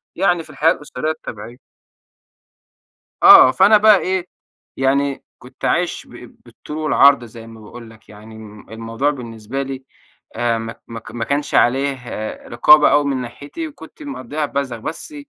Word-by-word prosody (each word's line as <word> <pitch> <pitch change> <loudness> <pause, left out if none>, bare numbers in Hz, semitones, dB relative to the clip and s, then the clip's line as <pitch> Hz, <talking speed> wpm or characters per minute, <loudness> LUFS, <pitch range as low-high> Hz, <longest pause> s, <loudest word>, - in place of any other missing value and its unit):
يعني 175 -3 +1
في - - -19
الحياة 165 +2 +2
الأسرية 150 +1 -4
الطبيعية. 120 -4 -9 1.7
آه، 130 - +9
فأنا 205 +6 +5
بقى 210 -1 +6
إيه، 185 -1 -2 0.5
يعني 140 +1 0 0.2
كنت - - -10
عايش - - -1
ب - - -14
بالطول 150 - -10
والعرض 140 -4 +4
زي 115 0 -12
ما 115 -1 -13
باقول 115 +2 -12
لك 110 0 -20
يعني، 110 +1 -14
الم 105 -2 -13
الموضوع 115 +5 -3
بالنسبة 120 -1 -6
لي 135 -1 -7 0.5
آآ، 120 -1 0
مك 115 0 -8
مك 115 -1 -10
ما 120 -1 -4
كانش 145 +1 -2
عليه 135 +2 +2 0.5
رقابة 150 +6 +5
أوي 145 0 +3
من 135 -2 -1
ناحيتي 145 - -8
وكنت 305 +1 -14
مقضيها 150 - -5
بذخ، 140 -4 -4
بس 165 - -8
135 Hz, 150 wpm, -18 LUFS, 115-150 Hz, 1.7 s, آه